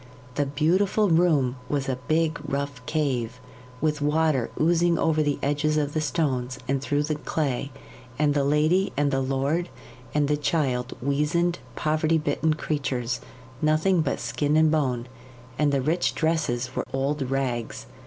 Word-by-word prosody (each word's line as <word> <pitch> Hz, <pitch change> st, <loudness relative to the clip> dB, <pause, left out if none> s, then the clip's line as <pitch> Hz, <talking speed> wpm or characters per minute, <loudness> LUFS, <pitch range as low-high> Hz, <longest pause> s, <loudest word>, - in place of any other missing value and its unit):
The 145 Hz, +1 st, 0 dB
beautiful 185 Hz, +8 st, +2 dB
room 155 Hz, -7 st, +3 dB
was 140 Hz, -2 st, -1 dB
a 130 Hz, -1 st, -2 dB
big, 160 Hz, 0 st, +1 dB
rough 140 Hz, -3 st, -3 dB
cave, 125 Hz, -6 st, -1 dB, 0.4 s
with 150 Hz, 0 st, 0 dB
water 150 Hz, -3 st, +2 dB
oozing 170 Hz, +1 st, +3 dB
over 155 Hz, -1 st, +2 dB
the 145 Hz, -2 st, +1 dB
edges 150 Hz, +2 st, +1 dB
of 145 Hz, -1 st, 0 dB
the 155 Hz, -, 0 dB
stones 130 Hz, -4 st, -1 dB
and 135 Hz, 0 st, 0 dB
through 145 Hz, +1 st, 0 dB
the 155 Hz, +1 st, -1 dB
clay; 145 Hz, -3 st, -2 dB, 0.5 s
and 150 Hz, -1 st, +2 dB
the 145 Hz, -1 st, +1 dB
lady, 155 Hz, +7 st, +2 dB
and 145 Hz, 0 st, +2 dB
the 135 Hz, -1 st, +1 dB
lord, 140 Hz, +6 st, 0 dB, 0.4 s
and 145 Hz, +1 st, +1 dB
the 150 Hz, 0 st, +1 dB
child 135 Hz, -5 st, -1 dB
weazened, 150 Hz, +5 st, +1 dB, 0.2 s
poverty 155 Hz, +1 st, +1 dB
bitten 155 Hz, +1 st, 0 dB
creatures 130 Hz, -5 st, -2 dB, 0.4 s
nothing 155 Hz, +4 st, +3 dB
but 150 Hz, -, -1 dB
skin 150 Hz, +1 st, 0 dB
and 155 Hz, -1 st, +5 dB
bone 130 Hz, -6 st, 0 dB, 0.5 s
and 150 Hz, -1 st, +3 dB
the 140 Hz, -1 st, +1 dB
rich 165 Hz, +5 st, +1 dB
dresses 135 Hz, -6 st, 0 dB
were -, -, 0 dB
old 135 Hz, 0 st, -1 dB
rags. 130 Hz, -4 st, -2 dB
150 Hz, 155 wpm, -25 LUFS, 135-155 Hz, 0.5 s, and